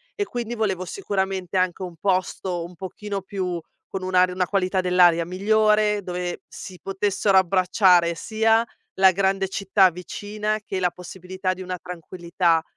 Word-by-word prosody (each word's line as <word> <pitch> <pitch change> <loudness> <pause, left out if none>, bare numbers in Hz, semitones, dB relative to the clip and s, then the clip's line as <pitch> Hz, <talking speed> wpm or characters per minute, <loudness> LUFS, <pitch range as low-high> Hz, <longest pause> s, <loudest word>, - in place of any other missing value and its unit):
E 410 - -1
quindi 240 - -4
volevo 195 -5 -1
sicuramente 190 - -2
anche 185 0 0
un 180 -2 -7
posto 185 -1 -1
un 175 - -11
pochino 195 +3 -5
più 185 -3 -4 0.3
con 195 - -5
un'ar 185 0 +3
una 180 0 -1
qualità 190 -1 +1
dell'aria 175 -2 +4
migliore, 210 +2 +2
dove 180 -1 -4
si 185 -2 -10
potessero 195 +1 +1
abbracciare 180 -1 +4
sia 225 +4 +2 0.3
la 190 0 +6
grande 195 +1 +1
città 190 0 +3
vicina 210 +4 -4
che 190 - -3
la 180 -1 +2
possibilità 185 +1 -5
di 185 - -10
una 185 0 -4
tranquillità. 170 -1 -1
185 Hz, 145 wpm, -23 LUFS, 180-200 Hz, 0.3 s, la